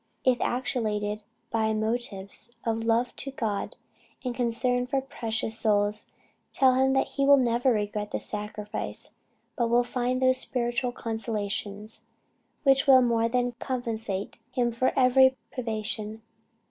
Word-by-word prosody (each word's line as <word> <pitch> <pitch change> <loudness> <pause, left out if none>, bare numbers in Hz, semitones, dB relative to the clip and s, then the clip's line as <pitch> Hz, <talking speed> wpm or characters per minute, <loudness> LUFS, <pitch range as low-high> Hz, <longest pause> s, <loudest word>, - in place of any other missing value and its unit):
If 255 -2 +3
actuated 215 -4 -1 0.3
by 220 -1 +1
motives 220 -1 -3
of 225 0 -1
love 235 +2 +1
to 275 - -4
God, 220 -7 -3 0.5
and 250 - -1
concern 245 +1 +1
for 270 +1 +1
precious 225 -4 -2
souls, 210 -1 +1 0.4
tell 260 -1 +4
him 265 +1 +3
he 275 - -2
will 280 0 +7
never 245 0 +2
regret 210 -1 -1
the - - -2
sacrifice, 210 0 -4 0.4
but 235 -1 +1
will 240 +1 +4
find 250 +1 -1
those 255 0 +4
spiritual 245 0 -1
consolations 215 -2 -3 0.6
which 270 0 +4
will 260 -2 +8
more 230 -1 +2
than 245 0 +1
compensate 225 -6 -3
him 245 -1 0
for 235 +3 +1
every 260 0 +5
privation. 220 -2 -3
235 Hz, 130 wpm, -27 LUFS, 215-255 Hz, 0.6 s, will